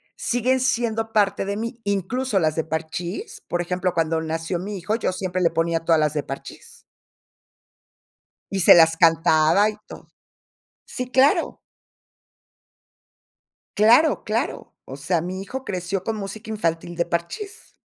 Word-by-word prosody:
siguen 250 Hz, +2 st, 0 dB
siendo 225 Hz, -3 st, -1 dB
parte 200 Hz, -2 st, +2 dB
de 200 Hz, +1 st, -3 dB
mí, 230 Hz, +2 st, -5 dB
incluso 200 Hz, +4 st, -1 dB
las 155 Hz, -3 st, +1 dB
de 160 Hz, -, 0 dB
Parchís, 165 Hz, -, -5 dB
por 175 Hz, 0 st, -1 dB
ejemplo, 180 Hz, +1 st, -2 dB
cuando 165 Hz, -1 st, 0 dB
nació 165 Hz, +2 st, -3 dB
mi 200 Hz, +2 st, -5 dB
hijo, 200 Hz, +4 st, -2 dB
yo 225 Hz, -, -1 dB
siempre 185 Hz, 0 st, -3 dB
le 170 Hz, -, +4 dB
ponía 165 Hz, 0 st, 0 dB
todas 165 Hz, -2 st, +4 dB
las 150 Hz, -1 st, +1 dB
de 150 Hz, -2 st, -2 dB
Parchís. 135 Hz, -, -10 dB, 1.7 s
Y 195 Hz, -, -1 dB
se 175 Hz, -, +8 dB
las 165 Hz, -1 st, +5 dB
cantaba 165 Hz, +3 st, +4 dB
y 215 Hz, -, -8 dB
todo. -, -, -12 dB, 0.8 s
Sí, 250 Hz, -1 st, -6 dB
claro. 265 Hz, +3 st, +3 dB, 2.2 s
Claro, 240 Hz, +9 st, +4 dB
claro. 220 Hz, +2 st, -3 dB
O 135 Hz, -, -9 dB
sea, 165 Hz, +4 st, 0 dB
mi 185 Hz, +3 st, -5 dB
hijo 260 Hz, +7 st, -6 dB
creció 185 Hz, -2 st, -3 dB
con 225 Hz, +1 st, -3 dB
música 215 Hz, +2 st, -7 dB
infantil, 175 Hz, -5 st, -2 dB
de 170 Hz, 0 st, 0 dB
Parchís. 385 Hz, -, -5 dB
185 Hz, 145 wpm, -23 LUFS, 165-220 Hz, 2.2 s, se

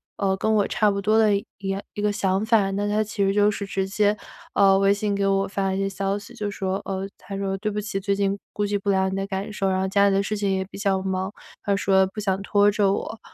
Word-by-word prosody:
呃， 195 Hz, -1 st, 0 dB
跟 220 Hz, +3 st, 0 dB
我 205 Hz, -2 st, +3 dB
差 215 Hz, -, +2 dB
不 200 Hz, 0 st, -1 dB
多 215 Hz, +2 st, +3 dB
的 215 Hz, -2 st, +4 dB
一 200 Hz, -, -3 dB
一 195 Hz, -, -6 dB
样 195 Hz, 0 st, -1 dB, 0.2 s
一 205 Hz, -, -3 dB
个 210 Hz, 0 st, +2 dB
想 195 Hz, 0 st, 0 dB
法。 220 Hz, -4 st, +3 dB
那 200 Hz, +1 st, -1 dB
他 210 Hz, +1 st, +2 dB
其 210 Hz, -1 st, -2 dB
实 195 Hz, -, +2 dB
就 205 Hz, +1 st, +4 dB
是 200 Hz, 0 st, -4 dB
直 195 Hz, -1 st, -1 dB
接， 205 Hz, +1 st, +2 dB, 0.4 s
呃， 195 Hz, -1 st, +5 dB
微 195 Hz, 0 st, +4 dB
信 205 Hz, 0 st, -1 dB
给 200 Hz, 0 st, 0 dB
我 195 Hz, 0 st, +2 dB
发 195 Hz, 0 st, -2 dB
了 190 Hz, -, -1 dB
一 -, -, -2 dB
些 195 Hz, -, 0 dB
消 195 Hz, +1 st, -2 dB
息， 215 Hz, +4 st, -11 dB
就 210 Hz, -3 st, -3 dB
说， 195 Hz, -1 st, -3 dB
呃， 190 Hz, 0 st, -3 dB
他 195 Hz, +2 st, -8 dB
说 195 Hz, -1 st, -2 dB
对 215 Hz, +2 st, -1 dB
不 210 Hz, -, -2 dB
起， 205 Hz, -1 st, -3 dB
最 200 Hz, +1 st, 0 dB
近 200 Hz, 0 st, 0 dB
顾 205 Hz, -, -1 dB
及 205 Hz, 0 st, -1 dB
不 200 Hz, -, -3 dB
了 190 Hz, -1 st, +2 dB
你 190 Hz, -, -3 dB
的 195 Hz, 0 st, -2 dB
感 195 Hz, +1 st, -4 dB
受， 195 Hz, -2 st, 0 dB
然 185 Hz, 0 st, +1 dB
后 190 Hz, -, 0 dB
家 200 Hz, +1 st, +3 dB
里 195 Hz, -, +1 dB
的 195 Hz, -, +2 dB
事 215 Hz, +2 st, -2 dB
情 200 Hz, -1 st, 0 dB
也 190 Hz, 0 st, 0 dB
比 195 Hz, -, -11 dB
较 195 Hz, -2 st, +1 dB
忙， 190 Hz, 0 st, -2 dB, 0.3 s
他 200 Hz, -, +1 dB
说 190 Hz, -1 st, +3 dB
不 195 Hz, -, -8 dB
想 195 Hz, -1 st, 0 dB
拖 205 Hz, +1 st, +3 dB
着 205 Hz, -2 st, +2 dB
我。 220 Hz, +2 st, -4 dB
200 Hz, 310 characters per minute, -24 LUFS, 195-205 Hz, 0.4 s, 呃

